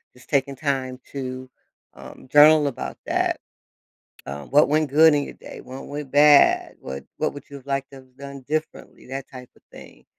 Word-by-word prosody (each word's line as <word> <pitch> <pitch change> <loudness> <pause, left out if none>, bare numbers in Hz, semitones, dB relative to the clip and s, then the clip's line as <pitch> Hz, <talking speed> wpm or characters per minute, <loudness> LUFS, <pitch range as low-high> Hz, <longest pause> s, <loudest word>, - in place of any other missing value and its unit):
just 125 - -20
taking 140 -1 0
time 130 -2 -3
to, 130 -1 -6 0.5
um, - - -13
journal 150 0 +7
about 135 - -5
that. - - 0 0.9
Um, 70 +1 -8
"What 150 +2 +5
went 155 0 +1
good 155 +3 +6
in 145 - 0
your - - -8
day? - - -11
What 130 +1 -10
went 145 -2 -7
bad? 145 0 +5
What 65 0 -7
what - - -1
would 145 - -12
you 140 - -10
have 135 - -16
liked 135 0 -3
to - - -12
have 130 -1 -19
done 140 0 -9
differently?" 155 +1 -5
That 135 +1 -7
type 125 -1 -11
of - - -25
thing. - - -15
140 Hz, 190 wpm, -23 LUFS, 130-145 Hz, 0.9 s, journal